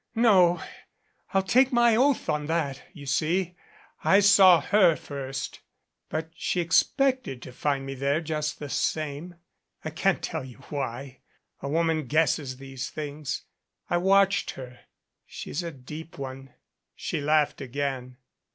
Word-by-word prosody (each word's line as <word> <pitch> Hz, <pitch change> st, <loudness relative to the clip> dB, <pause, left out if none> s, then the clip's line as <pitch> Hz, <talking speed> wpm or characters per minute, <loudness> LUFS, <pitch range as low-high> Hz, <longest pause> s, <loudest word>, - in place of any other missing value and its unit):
"No 190 Hz, -7 st, +5 dB, 0.7 s
I'll 195 Hz, 0 st, +2 dB
take 255 Hz, +7 st, +4 dB
my 240 Hz, -2 st, +4 dB
oath 265 Hz, +2 st, +2 dB
on 150 Hz, -1 st, -1 dB
that 155 Hz, -5 st, -1 dB
you 150 Hz, -6 st, -11 dB
see, 170 Hz, +6 st, 0 dB, 0.5 s
I 195 Hz, -, +5 dB
saw 195 Hz, -3 st, +7 dB
her 180 Hz, +1 st, +4 dB
first. 135 Hz, -2 st, -6 dB, 0.5 s
But 160 Hz, +1 st, -4 dB
she 180 Hz, -, -2 dB
expected 255 Hz, -, +2 dB
to -, -, -9 dB
find 135 Hz, +1 st, -1 dB
me 135 Hz, -, -5 dB
there 140 Hz, +3 st, 0 dB
just 150 Hz, -2 st, -3 dB
the 145 Hz, -, -6 dB
same. 155 Hz, +5 st, -2 dB, 0.5 s
I 155 Hz, -, -3 dB
can't 190 Hz, +5 st, 0 dB
tell 160 Hz, -4 st, -3 dB
you 130 Hz, -2 st, -11 dB
why 135 Hz, -2 st, -5 dB, 0.4 s
a 140 Hz, -, -4 dB
woman 160 Hz, -2 st, +1 dB
guesses 145 Hz, -3 st, +1 dB
these 135 Hz, -1 st, -6 dB
things. 150 Hz, -1 st, -5 dB, 0.5 s
I 175 Hz, -, +3 dB
watched 195 Hz, +2 st, +3 dB
her. 125 Hz, -2 st, -9 dB, 0.5 s
She's 170 Hz, -, -5 dB
a 170 Hz, -, -4 dB
deep 155 Hz, +5 st, -10 dB
one." 135 Hz, -1 st, -8 dB, 0.4 s
She 150 Hz, -, -3 dB
laughed 150 Hz, 0 st, +2 dB
again. 130 Hz, -1 st, -4 dB
155 Hz, 140 wpm, -26 LUFS, 135-180 Hz, 0.7 s, saw